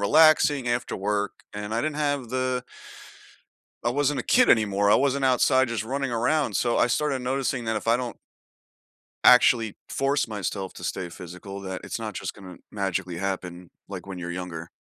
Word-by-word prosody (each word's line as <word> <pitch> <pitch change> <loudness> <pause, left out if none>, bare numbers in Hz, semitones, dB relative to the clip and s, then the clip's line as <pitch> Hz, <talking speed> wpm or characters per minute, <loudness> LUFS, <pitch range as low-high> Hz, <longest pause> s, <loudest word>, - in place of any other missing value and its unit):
relaxing 145 +2 +5
after 120 0 -1
work. 105 +1 -1 0.2
And 105 +1 -5
I 115 - +1
didn't 155 -1 -2
have 145 -4 -1
the 130 -1 -1 1.2
I - - +3
wasn't 145 +2 +1
a - - -18
kid 255 0 +4
anymore, 100 -2 +3
I - - +7
wasn't 140 0 +1
outside 130 0 +4
just 115 -2 -2
running 135 +3 -2
around, 120 +1 0
so 120 +7 +1
I - - +4
started 135 +1 0
noticing 130 -1 -1
that 110 0 -1
if - - -4
I 115 +1 +3
don't 125 -3 -4 1.1
actually 120 -3 +6
force 140 0 0
myself 100 -2 -4
to - - -11
stay 90 - -3
physical, 90 +3 -9
that 95 -1 -5
it's - - -4
not 110 -2 -5
just - - -5
gonna 95 -3 -11
magically 95 -3 -2
happen 90 -2 -4 0.2
like 95 -2 -7
when 95 -2 -7
you're 85 -1 -5
younger. 85 -2 -6
115 Hz, 180 wpm, -25 LUFS, 95-130 Hz, 1.2 s, I